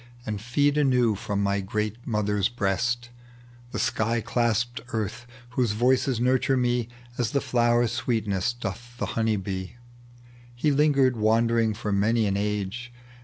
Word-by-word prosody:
And 105 -2 -3
feed 145 +5 +2
anew 125 -5 +3
from 100 -1 -2
my 100 0 +1
great 105 +4 -3
mother's 105 -3 +1
breast. 120 +2 -1 0.6
The - - -4
sliy 115 +2 0
claspcd 120 +1 0 0.2
Earth, 110 +2 -3 0.2
whose 125 -4 +1
voices 125 +2 +2
nurture 130 +2 +2
me 120 -2 0 0.3
As 120 -3 +1
the 140 - +3
flowers' 120 -2 +2
sweetness 115 -3 -1
doth 120 +1 -7
the - - -1
honey 110 -1 +1
bee." 95 +1 -5 0.8
He 145 +5 +1
lingered 140 -3 +3
wandering 115 0 +2
for 105 -1 -3
many 110 +3 +2
an 100 -1 0
age. 105 +3 -2
115 Hz, 140 wpm, -26 LUFS, 105-120 Hz, 0.8 s, anew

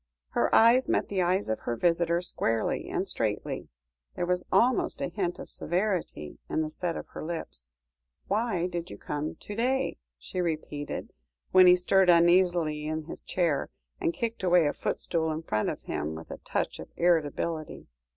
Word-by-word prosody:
Her - - +1
eyes 235 +3 +6
met - - +1
the 195 -2 0
eyes 185 +3 +1
of 110 - -1
her 120 - -3
visitor 170 +3 +2
squarely 115 -10 -1
and - - -1
straightly, - - -2 0.5
there - - -1
was 180 0 -1
almost 235 +6 +3
a - - -2
hint 180 -4 -2
of - - -8
severity 175 - -2
in 160 - 0
the 155 - -4
set 170 +1 -2
of - - -8
her - - -7
lips. 60 - -6 0.5
"Why 205 -4 0
did 175 -2 -4
you 100 - -8
come 150 +6 -4
to 205 - -8
day?" 255 - 0 0.2
she 180 - -4
repeated, 155 -3 -4 0.4
when 185 -1 +8
he 180 - +9
stirred 185 +1 +3
uneasily 170 -3 +4
in 155 0 -2
his 160 - -8
chair, 165 -6 0 0.3
and 340 -3 +1
kicked 235 -8 -3
away 180 -3 +4
a 145 - +1
footstool 160 -2 -1
in 155 +1 -4
front 110 -8 0
of - - -5
him, 75 +2 -3
with 80 +1 -9
a - - -7
touch - - -2
of - - -8
irritability. 165 -1 0
175 Hz, 175 wpm, -28 LUFS, 155-185 Hz, 0.5 s, he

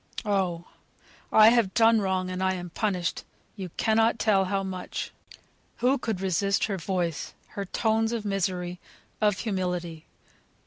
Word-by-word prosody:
Oh! 185 -4 0 0.7
I 215 0 +8
have 230 -5 +2
done 225 -1 +5
wrong, 185 -1 -1
and 185 0 -4
I 190 0 +1
am 175 -1 -7
punished; 180 -3 -1 0.3
you 190 -4 -6
cannot 225 +1 +3
tell 210 -3 +3
how 195 +1 -1
much." 185 -1 -5 0.6
Who 260 +3 +2
could 220 -6 -3
resist 195 +1 +1
her 200 -3 0
voice, 170 -3 -2
her 200 - -5
tones 220 +3 +1
of 230 -3 -3
misery, 180 -3 -2 0.4
of 210 -2 +3
humility? 180 -5 -3
195 Hz, 140 wpm, -27 LUFS, 180-215 Hz, 0.7 s, I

